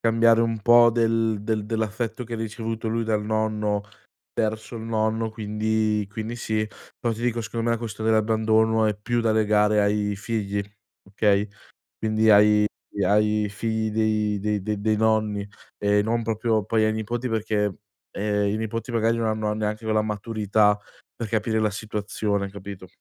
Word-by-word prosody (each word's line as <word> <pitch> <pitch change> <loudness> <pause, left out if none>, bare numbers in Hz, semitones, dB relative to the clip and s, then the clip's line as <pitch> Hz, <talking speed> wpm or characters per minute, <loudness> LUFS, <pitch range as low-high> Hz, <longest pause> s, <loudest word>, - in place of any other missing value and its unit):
cambiare 115 0 +4
un 115 -1 0
po' 120 +1 +7
del 115 -2 +1
del 105 -1 -1
dell'affetto 110 +2 -2
che 115 - -10
ha - - -1
ricevuto 115 0 -4
lui 115 +1 -1
dal 110 -1 0
nonno, 105 -1 -1 0.5
verso 110 +1 -2
il 110 - -6
nonno, 110 0 -1
quindi 110 0 0
quindi 110 +2 -5
sì, 110 -2 -1 0.3
però 115 -1 0
ti 115 - -8
dico 120 -1 0
secondo 115 +1 -3
me - - +3
la 115 - +1
questione 110 -1 -3
dell'abbandono 110 0 +3
è 105 - +1
più 120 +3 -1
da 115 -1 +2
legare 105 -1 +3
ai 105 0 0
figli, 105 -2 -2 0.5
okay, 100 0 +2 0.5
quindi 110 0 +2
ai 105 0 +6 0.4
ai 105 +1 +2
figli 110 +1 -2
dei 105 -1 +1
de 105 -1 -1
de 105 0 -2
dei 110 0 +1
nonni 110 -2 +1 0.3
e 105 0 +2
non 115 +2 0
proprio 110 -1 0
poi 110 +1 +2
ai 110 - +2
nipoti 115 +3 -3
perché, 105 -3 0 0.4
ehm, 105 0 0
i 105 - 0
nipoti 115 +2 -4
magari 115 0 +2
non 115 -1 -1
hanno 110 -1 0
neanche 105 +1 -3
quella 110 -1 +2
maturità 105 -1 +1 0.4
per 115 - -5
capire 110 0 0
la 105 -1 +2
situazione, 105 -1 -3
capito? 100 -1 -9
110 Hz, 165 wpm, -24 LUFS, 105-115 Hz, 0.5 s, po